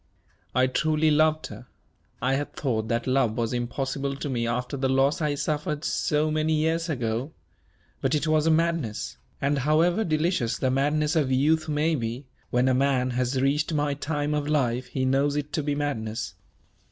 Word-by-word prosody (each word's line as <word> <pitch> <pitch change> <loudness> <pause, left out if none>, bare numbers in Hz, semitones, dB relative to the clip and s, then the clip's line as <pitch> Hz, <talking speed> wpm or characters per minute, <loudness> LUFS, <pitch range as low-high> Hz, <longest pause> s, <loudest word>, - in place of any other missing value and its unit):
I 130 0 +4
truly 155 +4 +2
loved 155 +1 +3
her. 125 - -10 0.6
I 130 +2 +2
had 145 +2 -2
thought 110 -6 -1
that 115 +1 -1
love 130 -4 +1
was 115 0 -1
impossible 135 +3 -2
to 140 +1 -5
me 120 -3 -1
after 125 +4 -2
the 135 -1 0
loss 135 +5 +2
I 150 -2 +1
suffered 150 +1 -2
so 155 0 +1
many 155 +1 +1
years 165 +2 0
ago. 125 +1 -2 0.7
But 135 +3 +1
it 150 0 0
was 155 0 +2
a - - +5
madness; 165 -8 0 0.2
and, 140 +1 +1
however 165 +8 +2
delicious 155 - 0
the 130 - 0
madness 150 +4 +1
of 145 -5 +2
youth 155 +4 +2
may 150 +2 +1
be, 120 -1 -3 0.2
when 125 +1 +2
a 130 - +3
man 130 -1 +2
has 125 +1 0
reached 150 +4 +1
my 145 -1 +1
time 145 +1 -2
of 150 -1 -1
life 130 -4 0
he 130 0 -2
knows 140 +2 +2
it 150 0 -3
to 155 - 0
be 145 0 -1
madness. 115 -7 -3
145 Hz, 180 wpm, -26 LUFS, 130-155 Hz, 0.7 s, a